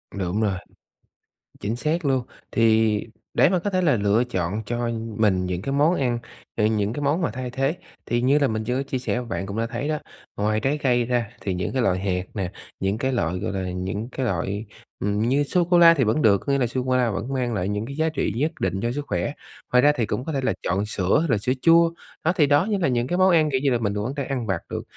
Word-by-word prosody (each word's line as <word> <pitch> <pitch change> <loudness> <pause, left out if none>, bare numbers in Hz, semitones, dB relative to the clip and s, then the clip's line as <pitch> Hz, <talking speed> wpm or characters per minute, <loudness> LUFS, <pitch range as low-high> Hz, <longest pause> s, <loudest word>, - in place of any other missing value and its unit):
Đúng 95 +2 -1
rồi, 105 -3 +1 1.1
chính 110 +3 -2
xác 155 +5 -1
luôn. 130 -2 +2 0.3
Thì 110 -1 +3 0.4
để - - +5
mà 185 -2 +2
có 205 - -2
thể 185 -1 +1
là 150 -8 +3
lựa 105 +4 +2
chọn 95 -2 -2
cho 120 +1 -2 0.3
mình 95 -4 +2
những 90 0 -3
cái 135 - -3
món 150 +5 +3
ăn, 120 -3 0 0.4
ờ, 105 - +2
những 105 0 +1
cái 145 - -4
món 145 +5 +1
mà 125 - 0
thay 125 +1 -5
thế, 135 +6 -1 0.3
thì 120 0 0
như 140 +4 +4
là 140 - +3
mình 110 0 -2
chưa 125 +4 -1
chia 130 -2 -3
sẻ 125 -1 -1
bạn 95 0 -3
cũng 100 +2 -5
đã 115 - 0
thấy 120 +5 -4
đó, 155 -1 0 0.4
ngoài 110 +1 +1
trái 140 +5 0
cây 125 -4 +2
ra 120 -2 0
thì 95 - -2
những 90 +5 -3
cái 130 - +1
loại 95 -5 +2
hạt 90 -2 -1
nè, 95 -4 -3 0.3
những 95 +2 0
cái 130 +3 -1
loại, 90 -6 -1
gọi 100 - -3
là, 95 -2 -3
những 95 +6 -4
cái 130 0 -3
loại, 100 +1 -2 0.3
ừm, 105 +1 0
như 135 +5 +2
sô 175 +5 +1
cô 175 +1 +3
la 170 -1 +9
thì 140 - +1
vẫn 115 +7 +1
được, 100 -2 +5
có 140 - 0
nghĩa 140 - +2
là 125 - +2
sô 125 +2 -2
cô 130 0 +1
la 120 -3 +2
vẫn 110 +8 -4
mang 125 -2 -1
lại 95 -2 -1
những 105 +2 -2
cái 140 +2 -7
giá 160 +1 +1
trị 155 - -1
nhất 150 +6 0
định 95 - -1
cho 120 - 0
sức 145 +3 -4
khỏe. 145 - -1 0.4
Ngoài 125 0 +5
ra 145 - +6
thì 115 - 0
cũng 125 +6 -3
có 160 - -3
thể 135 - -1
là 130 - +1
chọn 95 +4 0
sữa 95 -3 +1
hay 165 - -1
là 115 - +3
sữa 125 +5 0
chua, 165 0 +5 0.3
đó 170 +3 +2
thì 150 -6 +4
đó 145 +4 +4
như 205 - +1
là 180 - +1
những 120 -1 0
cái 175 - -1
món 185 0 +5
ăn, 155 -3 +4
kiểu 130 - +1
như 140 - +3
là, 120 - +3
mình 105 -3 -1
vẫn 105 - -2
có 130 - -3
thể 140 - -1
đang - - -7
ăn 115 - -4
vặt 95 -4 -1
được, - - -4
120 Hz, 275 wpm, -24 LUFS, 105-140 Hz, 1.1 s, la